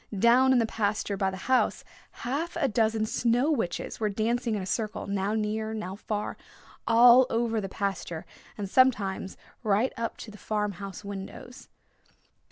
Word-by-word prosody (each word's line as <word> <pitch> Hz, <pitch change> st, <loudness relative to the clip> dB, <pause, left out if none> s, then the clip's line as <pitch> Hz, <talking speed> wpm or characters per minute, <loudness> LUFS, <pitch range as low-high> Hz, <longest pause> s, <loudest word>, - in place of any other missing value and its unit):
Down 245 Hz, +5 st, +5 dB
in 260 Hz, -, +5 dB
the 230 Hz, -, +3 dB
pasture 210 Hz, -2 st, -1 dB
by 195 Hz, -1 st, 0 dB
the 190 Hz, -, -6 dB
house 260 Hz, 0 st, +2 dB, 0.4 s
half 295 Hz, +8 st, -2 dB
a 320 Hz, -5 st, +1 dB
dozen 220 Hz, -1 st, +1 dB
Snow 245 Hz, +6 st, +1 dB
Witches 225 Hz, -, -2 dB
were 215 Hz, -1 st, +1 dB
dancing 225 Hz, +3 st, 0 dB
in 205 Hz, -, -2 dB
a -, -, -5 dB
circle, 215 Hz, +2 st, -2 dB
now 200 Hz, +1 st, -1 dB
near, 220 Hz, +1 st, -2 dB
now 190 Hz, -3 st, -5 dB
far, 210 Hz, 0 st, -4 dB, 0.5 s
all 245 Hz, +2 st, +7 dB
over 230 Hz, -1 st, 0 dB
the 195 Hz, -, -5 dB
pasture, 195 Hz, -5 st, -3 dB, 0.3 s
and 205 Hz, -2 st, -3 dB
sometimes 200 Hz, -5 st, +2 dB, 0.2 s
right 215 Hz, +3 st, +1 dB
up 230 Hz, 0 st, -3 dB
to 220 Hz, -, -9 dB
the 210 Hz, -, -13 dB
farm 210 Hz, -1 st, -1 dB
house 195 Hz, +1 st, -7 dB
windows. 200 Hz, +5 st, -8 dB
220 Hz, 165 wpm, -28 LUFS, 200-240 Hz, 0.5 s, all